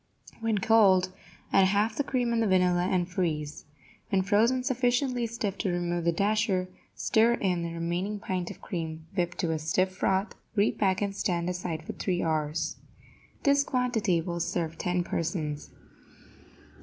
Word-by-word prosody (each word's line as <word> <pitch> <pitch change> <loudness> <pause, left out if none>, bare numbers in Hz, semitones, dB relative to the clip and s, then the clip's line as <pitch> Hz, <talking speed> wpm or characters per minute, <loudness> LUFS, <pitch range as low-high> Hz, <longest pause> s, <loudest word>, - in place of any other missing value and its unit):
When 225 -2 0
cold, 190 -3 +4 0.4
add 195 -1 +6
half 210 +3 +1
the 285 - 0
cream 245 -3 0
and 230 - +2
the 225 - +2
vanilla, 180 -1 +3
and 180 -2 +1
freeze. 155 -5 -2 0.4
When 195 -2 +2
frozen 225 +6 +3
sufficiently 250 -1 +1
stiff 215 -4 -3
to 200 - 0
remove 175 -1 -1
the 170 - +4
dasher, 200 0 +1 0.3
stir 230 +2 +3
in 180 -6 0
the 170 0 -3
remaining 175 +5 -2
pint 185 -3 -3
of - - -10
cream 160 -3 -5
whipped 175 -2 -1
to 170 -3 0
a 160 - -1
stiff 185 +4 +1
froth, 190 +2 0 0.2
repack 200 -2 +2
and 200 -1 -2
stand 175 -3 -1
aside 170 -3 -4
for - - -6
three 180 -2 -1
hours. 155 0 -1 0.7
This 280 -1 +4
quantity 235 -10 +1
will 170 +1 -4
serve 165 -1 -2
ten 180 0 0
persons. 155 -4 -3
185 Hz, 155 wpm, -28 LUFS, 170-220 Hz, 0.7 s, add